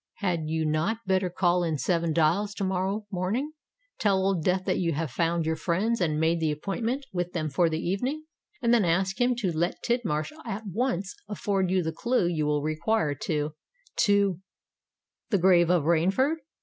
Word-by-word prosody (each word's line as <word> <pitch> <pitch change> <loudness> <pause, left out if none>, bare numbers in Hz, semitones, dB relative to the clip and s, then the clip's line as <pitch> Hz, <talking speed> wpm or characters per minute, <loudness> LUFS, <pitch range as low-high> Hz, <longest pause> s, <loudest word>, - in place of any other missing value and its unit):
Had 170 -6 -2
you 160 0 0
not 165 +10 -1
better 190 -1 +1
call 175 0 +2
in 160 -3 0
Seven 170 +4 0
Dials 170 +6 +1
to 200 - -3
morrow 190 +3 -1
morning, 205 +11 -1 0.5
tell 200 -3 +3
Old 190 -5 +1
Death 185 +2 +1
that - - 0
you 170 -2 0
have 155 -2 -2
found 165 +3 0
your 160 0 0
friends 190 +8 0
and 155 -3 +1
made 165 +1 +2
the 160 -2 +1
appointment 225 - -2
with 175 -1 -2
them 155 -3 -2
for 165 +5 +3
the 160 - -1
evening, 245 - -2 0.4
and 235 0 +4
then 230 -3 +4
ask 185 +5 +1
him 245 0 +3
to 190 -8 -2
let 170 +3 -1
Tidmarsh 215 - -1
at 220 -2 -5
once 200 -1 -1 0.2
afford 195 -2 0
you 185 -1 +2
the 160 0 -2
clue 240 +2 +1
you 160 -3 0
will 150 -1 +1
require 155 +2 0
to—to—the 185 - -1 1.0
grave 175 -2 +4
of 175 -4 +3
Rainford?" 190 - +2
180 Hz, 175 wpm, -27 LUFS, 160-205 Hz, 1.0 s, and